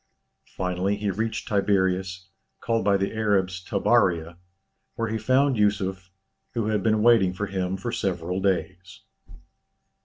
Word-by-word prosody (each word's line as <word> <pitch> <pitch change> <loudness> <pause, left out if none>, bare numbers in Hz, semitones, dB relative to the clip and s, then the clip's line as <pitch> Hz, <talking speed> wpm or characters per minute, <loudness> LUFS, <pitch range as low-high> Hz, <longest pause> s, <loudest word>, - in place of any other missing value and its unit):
Finally 90 +2 -1
he 100 -1 -2
reached 110 +3 -3
Tiberias, 95 -3 0 0.3
called 115 -2 0
by 100 0 +3
the 100 +2 -2
Arabs 95 -4 0
Tabaria, 85 -1 +1 0.6
where 115 -2 -2
he 110 - -1
found 130 0 +2
Yusuf, 95 -3 0 0.5
who 110 -2 0
had 105 -2 0
been 110 +1 +2
waiting 115 -6 +5
for 105 +3 -3
him 95 -1 -2
for 110 +5 -4
several 90 -2 -2
days. 95 -1 -2
95 Hz, 130 wpm, -25 LUFS, 95-110 Hz, 0.6 s, waiting